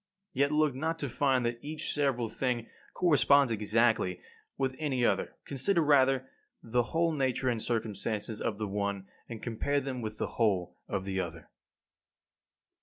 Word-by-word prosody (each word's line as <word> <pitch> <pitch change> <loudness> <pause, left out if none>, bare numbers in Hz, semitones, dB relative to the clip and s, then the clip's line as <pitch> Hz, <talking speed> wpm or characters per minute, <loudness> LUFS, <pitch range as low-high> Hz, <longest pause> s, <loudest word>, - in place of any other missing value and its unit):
Yet 140 +2 +2
look 150 -2 +3
not 160 +5 -2
to 145 - -3
find 130 0 +2
that 120 0 -2
each 155 +1 -4
several 135 -5 +1
thing 120 +1 -1 0.3
corresponds 140 -6 +4
exactly 110 -3 +2 0.4
with 130 -1 -1
any 135 -5 +1
other. - - 0
Consider 160 +6 +2
rather 135 -3 +4 0.4
the 120 +2 +1
whole 165 0 +2
nature 130 -3 0
and 115 -3 -1
circumstances 110 -1 -2
of 105 - -1
the 105 -1 -2
one, 100 -1 -2 0.2
and 115 -2 -7
compare 125 +5 0
them 130 -2 -4
with 110 -1 -5
the - - -1 0.2
whole 90 -5 +1
of 95 - -3
the 95 -1 -2
other. 85 -3 -6
125 Hz, 155 wpm, -30 LUFS, 110-140 Hz, 0.4 s, corresponds